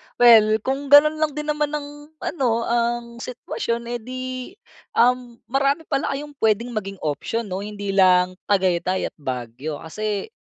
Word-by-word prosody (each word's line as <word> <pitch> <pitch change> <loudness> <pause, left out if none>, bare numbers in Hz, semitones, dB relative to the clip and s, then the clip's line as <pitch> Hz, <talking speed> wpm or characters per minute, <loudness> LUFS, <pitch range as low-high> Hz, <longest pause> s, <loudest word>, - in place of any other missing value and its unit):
Well, 220 -3 +6
kung 270 +2 -2
ganun 300 +2 +7
lang 305 -2 0
din 300 0 -2
naman 300 0 -1
ang 290 0 -7 0.2
ano 235 -7 0
ang 235 0 -1
sitwasyon 235 -1 -4
eh 240 - -2
di, 255 +3 -6 0.7
um, 245 0 +2 0.2
marami 275 +4 +1
pala 275 0 0
kayong 295 +1 -6
puwedeng 220 +2 +1
maging 195 -3 -4
option 155 +10 -2
'no 190 -3 -4
hindi 205 -1 -5
lang 185 -2 +4 0.2
Tagaytay 185 -2 +1
at - - -66
Baguio 130 +2 -5
kasi, 210 - -4
235 Hz, 150 wpm, -22 LUFS, 200-275 Hz, 0.7 s, ganun